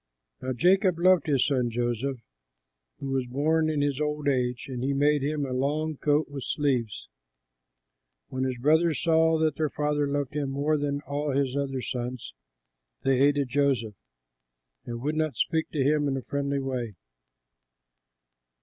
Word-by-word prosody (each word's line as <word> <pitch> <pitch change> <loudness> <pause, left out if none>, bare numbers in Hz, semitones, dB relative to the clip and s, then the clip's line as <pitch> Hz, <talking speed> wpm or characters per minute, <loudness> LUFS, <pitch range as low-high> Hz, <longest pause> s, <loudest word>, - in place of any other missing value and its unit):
Now 130 0 -2
Jacob 185 - +3
loved 180 -2 +4
his 135 -4 +3
son 130 -4 +1
Joseph, 120 +3 -2 0.8
who 135 - -5
was 130 -2 -1
born 155 +5 +1
in 150 -2 0
his 145 0 0
old 150 -1 -2
age; 125 -3 0
and 125 -2 -5
he 140 +1 0
made 145 +1 +3
him 145 +1 -1
a 130 - -4
long 150 +4 -1
coat 150 +2 +1
with 140 -2 -7
sleeves. 125 -8 -1 1.2
When 130 0 -2
his 130 -1 -1
brothers 155 +2 +3
saw 160 0 +3
that 155 -2 +1
their 155 -1 0
father 150 0 0
loved 140 -1 -2
him 145 -2 -2
more 145 +3 0
than 145 -1 -1
all 145 0 -3
his 135 -1 0
other 135 -2 -2
sons, 125 - -5 0.7
they 135 -1 +2
hated 140 -1 +3
Joseph 135 -6 +1 0.9
and 120 0 -5
would 150 +2 0
not 155 -2 0
speak 160 -2 0
to 145 -4 0
him 145 +1 +2
in 135 -1 0
a 130 - -5
friendly 140 0 -2
way. 125 -6 -3
140 Hz, 160 wpm, -27 LUFS, 130-150 Hz, 1.2 s, loved